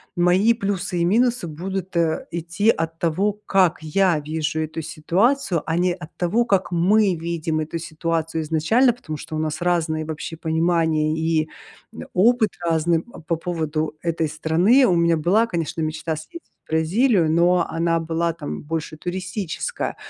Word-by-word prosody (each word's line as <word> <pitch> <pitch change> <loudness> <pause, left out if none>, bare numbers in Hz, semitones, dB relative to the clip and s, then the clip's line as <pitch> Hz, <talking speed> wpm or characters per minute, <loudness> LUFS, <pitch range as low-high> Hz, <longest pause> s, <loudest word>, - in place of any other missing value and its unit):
мои 185 +6 +4
плюсы 195 -4 -2
и 170 - +2
минусы 235 0 +2
будут, 185 +3 -5
э, 165 -1 0
идти 175 +6 +1
от 165 0 -4
того, 185 +5 +1
как 185 -5 +2
я 170 +1 +2
вижу 155 +1 -3
эту 160 +1 -3
ситуацию, 175 - 0
а 160 +1 -1
не 180 0 +2
от 170 -3 -9
того, 195 +7 +1
как 190 -5 +1
мы 195 +3 +3
видим 160 -1 -2
эту 155 +2 -4
ситуацию 165 0 -2
изначально. 165 - +3
Потому 155 -10 -7
что 155 - -7
у - - -1
нас 155 +2 -2
разные 165 -3 0
вообще 160 +1 -5
понимания, 160 -1 +1
и, 160 -1 +1 0.5
м, - - -8
опыт 220 +3 +4 0.2
разный, 165 +1 +2
э, 240 +2 -12
по 165 0 0
поводу 155 -3 -2
этой 165 -1 -1
страны. 175 - +3
У 180 - +3
меня 170 0 +3
была, 205 +9 +2
конечно, 165 -4 -3
мечта 155 +1 -2
съездить 335 - -10 0.2
в - - -35
Бразилию, 170 +2 +2
но 175 +1 +3
она 165 0 +1
была 165 +1 -1
там 155 -3 -6
больше 155 0 -4
туристическая. 180 +1 -4
170 Hz, 160 wpm, -22 LUFS, 160-185 Hz, 0.5 s, мои